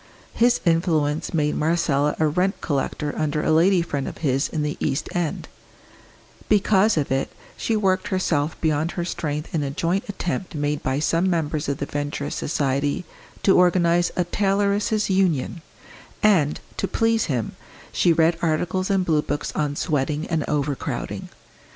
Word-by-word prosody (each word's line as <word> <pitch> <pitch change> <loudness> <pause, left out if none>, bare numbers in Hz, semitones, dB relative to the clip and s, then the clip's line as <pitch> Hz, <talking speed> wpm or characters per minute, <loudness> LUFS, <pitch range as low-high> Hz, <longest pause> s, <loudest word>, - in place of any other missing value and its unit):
His 240 +1 +3
influence 165 -2 +1
made 150 -3 +1
Marcella 150 -2 +1
a 160 - +2
rent 180 +6 0
collector 145 0 -2
under 150 0 -1
a - - +1
lady 175 +3 +4
friend 145 -5 -3
of - - -6
his 135 +1 +2
in 155 -2 -2
the 150 0 -2
East 135 - -1
End; 175 -3 -2 1.0
because 210 -1 +3
of 145 -3 -1
it, 135 0 0 0.2
she 225 - -1
worked 190 -3 +1
herself 160 -5 0
beyond 155 +1 0
her 175 - -2
strength 150 -2 -4
in 160 - +1
a 140 - -2
joint 170 +6 -1
attempt 185 -2 -3
made 145 0 -1
by 130 +1 -1
some 165 +5 +1
members 155 -3 -1
of 140 - -1
the 140 - -3
Venturist 145 0 -3
Society 140 +2 -1 0.4
to 195 - +5
organise 175 -1 +4
a 180 - +1
Tailoresses' 200 +2 +1
Union; 180 -4 +1 0.6
and, 175 -9 +3 0.2
to - - -1
please 225 -1 +1
him, 125 -7 -2 0.4
she 175 - +3
read 165 +1 +3
articles 175 +3 0
and 195 -2 +2
blue 155 -3 +2
books 145 0 -3
on 150 -2 -1
Sweating 150 0 -1
and 160 -3 0
Overcrowding. 145 -2 -3
160 Hz, 155 wpm, -23 LUFS, 145-185 Hz, 1.0 s, to